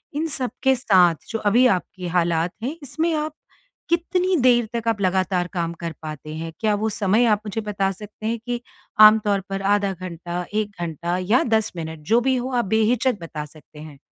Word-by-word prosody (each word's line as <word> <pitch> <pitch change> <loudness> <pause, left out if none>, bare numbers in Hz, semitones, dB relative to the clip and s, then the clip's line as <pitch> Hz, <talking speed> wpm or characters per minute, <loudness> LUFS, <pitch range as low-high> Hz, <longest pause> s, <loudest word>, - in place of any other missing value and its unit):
इन 315 +2 0
सबके 265 -1 0
साथ 185 -9 +4
जो 225 - -2
अभी 220 +5 +4
आपकी 180 -3 -2
हालात 170 -1 +1
हैं, 280 +7 -3
इसमें 320 +5 -1
आप 305 0 -2 0.6
कितनी 360 +2 +1
देर 240 -3 +4
तक 230 -1 -2
आप 225 -3 0
लगातार 185 -1 +1
काम 170 -3 -2
कर 170 -1 -4
पाते 155 0 -7
हैं? 165 +1 -5
क्या 215 -2 +2
वो 215 +2 -1
समय 210 +3 +2
आप 205 - -6
मुझे 210 +2 -3
बता 200 -2 -1
सकते 210 +2 -9
हैं 230 +1 -1
कि 240 -1 -2 0.4
आमतौर 215 -2 +7
पर 195 0 -3
आधा 200 -1 +1
घंटा, 175 -1 -5
1 215 -1 0
घंटा 170 +1 -2
या 250 - +5
10 220 -2 +1
मिनट 160 -1 -5
जो 235 - +6
भी 260 +1 +1
हो 250 +1 -3
आप - - -5
बेहिचक 220 +3 +1
बता 155 -2 -5
सकते 150 0 -16
हैं। 150 -2 -11
205 Hz, 190 wpm, -22 LUFS, 175-240 Hz, 0.6 s, आमतौर